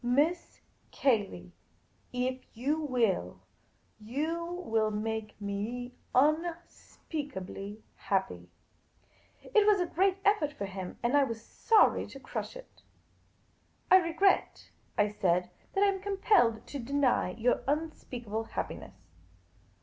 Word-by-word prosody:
" - - -32
Miss 295 +8 +1 0.3
Cayley, 200 - 0 0.6
if 255 +1 -1 0.2
you 285 +6 0
will, 235 - 0 0.6
you 300 +10 -2 0.2
will 220 -1 +2
make 215 0 -3
me 215 +5 -4 0.2
un 305 +5 +5 0.2
speakably 210 - -7
happy." 90 - -2 0.9
It 430 -4 +3
was 415 -2 +5
a 355 - +2
great 380 +3 +2
effort 330 -8 +3
for 200 - -4
him 190 -2 -6
— - - -33
and 240 +4 +2
I 285 - +6
was 230 -4 -2
sorrj^ 425 - +3
to - - -9
crush - - -5
it. - - -13 0.5
" - - -38
I 375 - +11
regret," 365 +2 +1 0.3
I 210 - +4
said, 180 -3 0
" - - -33
that 390 - +4
I - - +6
am 385 - -6
compelled 385 - +2
to 285 - -6
deny 260 -6 +1
you 245 +2 +2
un 310 +3 0
speakable 225 -6 -5
happiness." - - -5
250 Hz, 135 wpm, -30 LUFS, 210-320 Hz, 0.9 s, I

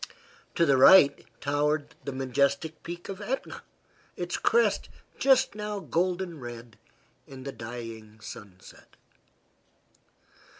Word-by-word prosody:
To 170 - +4
the 140 -3 +4
right 140 0 +7 0.2
towered 145 +1 0
the 140 - -3
majestic 140 +4 0
peak 175 +1 -8
of 195 0 -7
Etna, 255 +6 -4 0.6
its - - -3
crest 470 +1 +2 0.3
just 265 -3 +4
now 210 0 -4
golden 180 -2 -1
red 120 -2 -9 0.5
in 130 -1 -10
the 140 - -5
dying 115 -3 -8
sunset. 95 -4 -12
140 Hz, 110 wpm, -28 LUFS, 120-185 Hz, 0.6 s, right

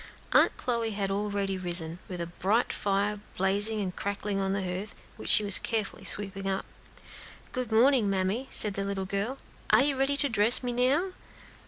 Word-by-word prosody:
Aunt - - +4
Chloe 235 -3 -2
had 195 -1 -2
already 200 -1 -2
risen, 175 -2 -1
and 180 -2 -6
a 170 - -3
bright 195 +7 -1
fire 200 +1 -1
was 205 - -21
blazing 205 +3 +1
and 185 -2 -4
crackling 200 0 -4
on 195 0 -1
the 195 0 -2
hearth, 185 +3 -5 0.2
which - - -8
she 215 - +7
was 200 -2 +7
carefully 220 -3 -3
sweeping 195 -1 +1
up. 190 0 -3 0.9
"Good 250 -3 -4
morning, 235 -1 +3
mammy," 195 +7 -2
said 210 -2 +2
the 195 - -4
little 195 -1 -4
girl. 200 +7 -3 0.3
"Are - - +5
you 285 -1 +1
ready 270 +1 0
to 285 - +3
dress 225 +1 +5
me 245 - -2
now?" 270 +10 +1
205 Hz, 185 wpm, -27 LUFS, 195-235 Hz, 0.9 s, she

